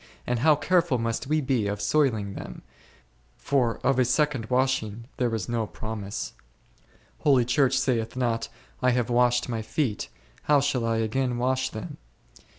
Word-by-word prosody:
and 125 -1 0
how 150 +4 +5
careful 165 -1 +2
must 115 +2 -2
we 155 +1 +1
be 130 -6 0
of 100 0 -2
soiling 110 -4 +1
them, - - -8 0.7
for 125 -5 +1
of 135 -1 +3
a - - +6
second 130 -2 +1
washing 125 -4 0
there 125 -2 +1
is 110 - -4
no 115 -2 -1
pro 110 +2 -6
mise. 100 -1 -5 0.9
Holy 135 -5 +4
Church 130 +2 +2
saith 120 -4 0
not, 120 -3 -1 0.3
I 125 - +4
have 125 -1 0
washed 120 0 +3
my 115 -3 -2
feet, 110 -1 -2 0.4
how 145 -1 +5
shall 135 -4 0
I 115 0 +1
again 120 +3 0
wash 130 +1 0
them 110 -4 -7
125 Hz, 160 wpm, -26 LUFS, 115-135 Hz, 0.9 s, a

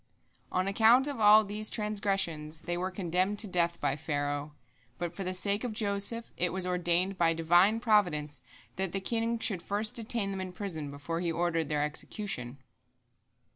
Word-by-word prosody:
" - - -39
On 185 +1 0
account 225 +6 +5
of 285 -4 -3
all 215 0 +7
these 210 +1 -1
transgressions 195 -8 -2
they 175 +1 -3
were 180 +2 -2
condemned 185 +2 -1
to 215 - +1
death 170 -2 0
by 135 - 0
Pharaoh, 145 0 -3 0.4
but 175 -1 -4
for 195 - -5
the 185 0 -2
sake 200 +4 +1
of 245 -3 -3
Joseph 210 +2 -1
it 180 -1 +1
was 185 0 -2
ordained 180 +1 +1
by 165 -1 +3
Divine 175 +7 +4
providence 170 - +1 0.4
that 190 -2 -2
the 195 - 0
king 230 +3 -1
should 200 -6 -1
first 210 +3 0
detain 225 -3 -1
them 190 -1 -4
in 185 -1 -6
prison 170 -7 -5
before 145 +4 -5
he 170 -1 -1
ordered 165 -2 -1
their 150 -1 +1
execution. 150 - -3
185 Hz, 175 wpm, -30 LUFS, 165-210 Hz, 0.4 s, all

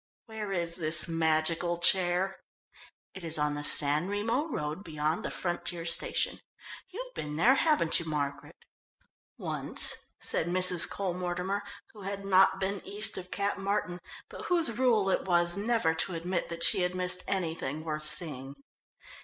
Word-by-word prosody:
"Where 220 -3 -6
is 170 -2 -2
this 155 -2 +1
magical 165 +1 0
chair?" 180 +2 +2 0.7
"It 190 - -10
is 165 -1 0
on 150 0 0
the 145 0 -5
San 145 +3 +5
Remo 225 +9 -1
road 155 - -4
beyond 155 -1 -2
the - - -3
frontier 175 -1 -3
station. 170 - -1 0.5
You've - - -8
been 150 0 -6
there, 225 +12 +4
haven't 290 - +2
you, 170 - -7
Margaret?" 145 -2 -4 0.8
"Once," - - +5
said 165 - -2
Mrs. 180 0 +2
Cole 195 -3 -3
Mortimer, 180 +3 -3 0.3
who 210 - -13
had 200 0 -6
not 190 0 +4
been 195 0 -3
east 210 +2 +1
of 185 -1 -5
Cap 200 +1 -2
Martin, 195 -2 -2 0.3
but - - -10
whose 335 -10 +1
rule 230 -6 +2
it - - -1
was 175 -1 +2
never 210 -5 0
to 170 +2 0
admit 175 +2 -3
that 170 0 -2
she 195 - +4
had 180 0 -1
missed 180 0 -1
anything 160 -5 -3
worth 155 -1 -4
seeing. 145 -4 -5
180 Hz, 155 wpm, -29 LUFS, 160-200 Hz, 0.8 s, San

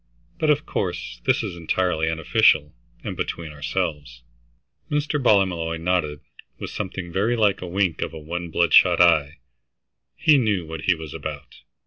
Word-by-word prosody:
But, 155 - +1
of 150 +1 +2
course, 90 -3 -4
this - - +2
is - - -5
entirely 85 -1 0
unofficial, 80 -2 +2 0.3
and - - -5
between 80 -2 -4
ourselves." 70 -4 -4 0.7
Mr. 150 0 -1
Ballymolloy 90 -8 +2
nodded 80 -4 -1 0.4
with - - -7
something 95 -3 -5
very 105 +7 +1
like 105 -4 +2
a 90 - -5
wink 90 -1 -1
of - - -2
one 85 +2 -5
bloodshot 85 +1 +4
eye. 80 -5 +4 0.8
He 150 -3 +4
knew 105 -8 0
what 80 +1 -7
he 90 - +4
was 80 -2 -9
about. - - -7
85 Hz, 145 wpm, -23 LUFS, 80-100 Hz, 0.8 s, bloodshot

